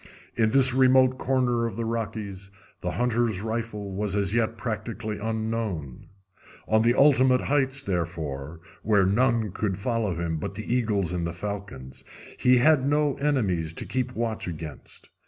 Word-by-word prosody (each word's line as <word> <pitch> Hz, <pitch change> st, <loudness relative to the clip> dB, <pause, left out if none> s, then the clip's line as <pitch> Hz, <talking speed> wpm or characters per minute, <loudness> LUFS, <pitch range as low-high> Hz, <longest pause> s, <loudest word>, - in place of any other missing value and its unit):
In 110 Hz, -2 st, +2 dB
this 130 Hz, +1 st, +7 dB
remote 130 Hz, 0 st, +4 dB
corner 125 Hz, -3 st, +1 dB
of 115 Hz, -, -6 dB
the 115 Hz, -, -2 dB
Rockies 105 Hz, -4 st, -4 dB, 0.3 s
the 90 Hz, 0 st, -3 dB
hunter's 120 Hz, -4 st, 0 dB
rifle 110 Hz, -2 st, -4 dB
was 100 Hz, +1 st, -2 dB
as 100 Hz, -1 st, 0 dB
yet 115 Hz, 0 st, 0 dB
practically 110 Hz, -2 st, -4 dB
unknown. 110 Hz, -, -3 dB, 0.6 s
On 110 Hz, 0 st, +3 dB
the 120 Hz, +2 st, +3 dB
ultimate 130 Hz, -3 st, +5 dB
heights, 135 Hz, -1 st, 0 dB
therefore, 80 Hz, -5 st, -4 dB, 0.2 s
where 100 Hz, -3 st, +3 dB
none 115 Hz, +1 st, +1 dB
could 95 Hz, -1 st, -2 dB
follow 110 Hz, -3 st, -1 dB
him 85 Hz, -1 st, -2 dB
but 95 Hz, -, -5 dB
the 110 Hz, +3 st, -3 dB
eagles 105 Hz, -8 st, 0 dB
and 85 Hz, -1 st, -2 dB
the 85 Hz, -, -5 dB
falcons, 95 Hz, -10 st, -7 dB, 0.4 s
he 125 Hz, 0 st, +5 dB
had 145 Hz, +1 st, +4 dB
no 145 Hz, +1 st, +2 dB
enemies 100 Hz, -, 0 dB
to -, -, -4 dB
keep 125 Hz, -1 st, -3 dB
watch 115 Hz, -3 st, -3 dB
against. 80 Hz, -3 st, -9 dB
110 Hz, 155 wpm, -26 LUFS, 95-125 Hz, 0.6 s, this